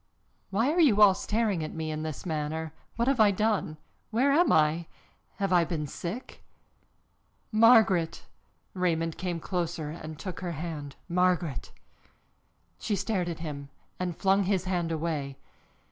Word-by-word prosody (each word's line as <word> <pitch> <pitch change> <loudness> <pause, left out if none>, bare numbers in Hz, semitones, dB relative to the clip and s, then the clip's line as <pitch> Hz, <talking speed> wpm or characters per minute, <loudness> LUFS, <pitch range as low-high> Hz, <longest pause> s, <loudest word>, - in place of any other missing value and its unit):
Why 225 +8 +1
are 345 - 0
you 260 -11 +5
all 205 -2 +8
staring 210 -3 -1
at 155 - -6
me 160 -1 -3
in 155 0 -3
this 155 0 -5
manner? 160 -1 -3 0.2
What 235 +1 0
have 270 -2 +2
I 215 -1 +7
done? 200 -6 0 0.3
Where 255 +5 +2
am 340 +5 +4
I? 160 +2 +3 0.5
Have 195 -2 -1
I 175 -1 +5
been 160 -2 -3
sick?" 180 - -7 1.1
"Margaret!" 215 -7 +4 0.5
Raymond 165 -3 -1
came 175 -2 -2
closer 170 -3 -3
and 155 -1 -8
took 180 +1 -6
her 175 -2 -4
hand. 150 -3 -6
"Margaret!" 180 -5 0 1.1
She 210 - -1
stared 195 -2 -1
at 165 -1 -6
him 140 -3 -6 0.3
and 180 -2 -3
flung 195 0 +3
his 190 -2 +1
hand 175 -3 -1
away. 155 -4 -3
175 Hz, 145 wpm, -28 LUFS, 160-200 Hz, 1.1 s, all